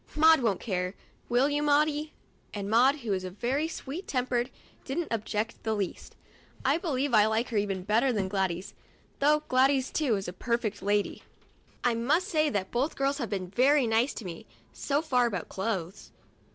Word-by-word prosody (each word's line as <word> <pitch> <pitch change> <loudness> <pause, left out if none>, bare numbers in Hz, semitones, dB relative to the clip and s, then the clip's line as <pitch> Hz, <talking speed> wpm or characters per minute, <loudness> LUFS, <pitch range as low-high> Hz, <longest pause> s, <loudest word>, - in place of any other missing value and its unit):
Maud 320 -1 +6
won't 215 -6 +1
care, 185 -3 -2 0.3
will 245 +3 +3
you, 290 0 0
Maudie 300 +1 +2 0.2
}" - - -37
And 200 0 -4
Maud, 265 +6 +4
who 220 -4 -1
is 185 -1 -2
very 240 - -1
sweet 325 +2 -6
tempered, 250 -1 0 0.3
didn't 310 +5 -3
object 220 0 -2
in - - -30
the 220 -1 -1
least. 200 -3 -4 0.5
I 280 +5 +3
believe 285 -6 -1
I 215 -1 +6
like 220 +2 0
her 225 - -1
even 195 -2 -1
better 225 +7 +2
than 205 -5 -1
Gladys, 190 -2 -2 0.5
though 300 +2 +3
Gladys, 265 +1 +3
too, 280 -8 +1
is 195 -1 -4
a 180 - -5
perfect 235 -2 -2
lady. 205 +1 0 0.6
I 245 - +3
must 300 - +1
say 310 -4 +2
that 195 -5 -2
both 265 +6 0
girls 275 +1 0
have 235 -6 -3
been 185 -3 -3
very 270 +4 +4
nice 230 +4 +1
to 225 - -7
me 170 -8 -8 0.3
so 290 +2 -1
far 250 -6 +2
about 190 -7 -4
clothes. 190 -3 -4
240 Hz, 185 wpm, -28 LUFS, 205-285 Hz, 0.6 s, Maud